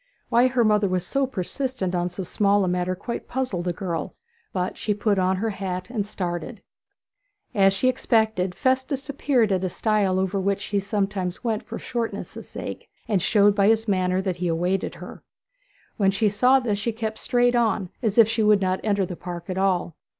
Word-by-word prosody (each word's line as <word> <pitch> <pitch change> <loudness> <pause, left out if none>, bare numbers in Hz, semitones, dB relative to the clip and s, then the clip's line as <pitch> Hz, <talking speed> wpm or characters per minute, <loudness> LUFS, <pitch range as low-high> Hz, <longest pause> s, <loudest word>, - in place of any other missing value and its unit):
Why 240 +1 +5
her 250 -2 +2
mother 210 -2 +3
was 185 -1 -1
so 275 +5 0
persistent 250 -2 -3
on 175 0 0
so 180 +2 -6
small 200 +2 +2
a - - 0
matter 180 +1 0
quite 235 +6 -5
puzzled 250 -9 -2
the 175 - +1
girl; 170 -2 -4 0.4
but 180 -1 -2
she 210 -2 -1
put 205 -1 +1
on 185 0 +2
her 220 +4 -1
hat 185 0 -4
and 210 -5 -2
started. 175 -5 -4 0.9
As 195 -1 +5
she 195 +6 -2
had 255 - +4
expected, 220 -7 +1
Festus 260 +1 0
appeared 260 -6 +1
at 190 -1 +1
a 185 - 0
stile 205 -1 +1
over 190 +1 0
which 200 +1 0
she 205 0 -1
sometimes 195 -2 -2
went 225 -3 0
for - - -7
shortness' 235 -2 -5
sake, - - -7 0.2
and 200 -4 +1
showed 205 +2 +4
by 200 -1 +4
his 225 +1 +3
manner 185 -1 +1
that 185 -2 -2
he 180 0 -2
awaited 175 +3 0
her. - - -10 0.8
When 195 -2 +3
she 205 +2 +2
saw 250 +7 +4
this 215 -5 -1
she 230 +2 -2
kept 220 -1 -4
straight 245 0 +2
on, 220 -6 +1
as 220 -3 -1
if 230 -2 +8
she 225 0 0
would 210 -1 +5
not 185 -1 0
enter 200 -3 +1
the 180 - -6
park 175 +1 -7
at 185 - -4
all. 185 -4 +1
200 Hz, 200 wpm, -24 LUFS, 185-225 Hz, 0.9 s, if